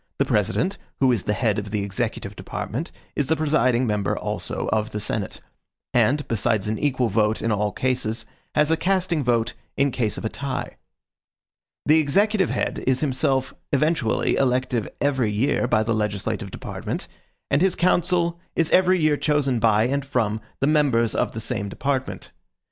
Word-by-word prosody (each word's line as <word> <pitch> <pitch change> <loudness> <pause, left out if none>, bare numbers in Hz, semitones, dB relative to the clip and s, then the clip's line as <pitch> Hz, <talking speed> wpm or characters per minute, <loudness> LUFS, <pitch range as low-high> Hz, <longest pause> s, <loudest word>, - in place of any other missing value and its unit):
The - - +2
President, 105 - 0 0.2
who 130 -2 +4
is 115 -6 0
the 105 - +1
head 105 -3 +1
of 100 0 -6
the 105 -1 -1
executive 100 -1 -3
department, 145 - -5 0.2
is 145 - 0
the 160 - +2
presiding 135 -6 +2
member 105 -3 0
also - - -3
of 110 0 0
the 105 - -4
Senate; 105 -1 -3 0.5
and, 145 +2 +2
besides 110 -2 +1
an 110 +1 -1
equal 130 -4 +1
vote 105 +1 +1
in 115 - +1
all 105 0 +1
cases, 115 -3 -1 0.3
has 150 +1 +3
a 165 - +3
casting 180 -4 +1
vote 120 -2 +1 0.2
in 140 0 +3
case 115 -4 -1
of - - -5
a - - +3
tie. 135 +3 -4 1.1
The 155 +2 +5
executive 195 +6 +2
head - - -2
is 130 -1 +2
himself 130 -2 0 0.2
eventually 150 -4 +1
elective 125 -3 +1
every 135 -6 +1
year 125 +4 +1
by 110 -2 +3
the 115 +1 0
legislative 105 -2 -2
department, - - -5 0.4
and 145 - +3
his 190 -1 +3
council 175 -1 +2 0.2
is 165 -2 +1
every 185 0 +5
year 155 -2 +3
chosen 145 -5 +1
by 110 -1 +4
and 140 +4 0
from 115 -6 -1 0.2
the - - +3
members 140 -7 +3
of - - 0
the 115 - -4
same 105 -2 -2
department. 135 +4 -3
130 Hz, 170 wpm, -23 LUFS, 110-150 Hz, 1.1 s, The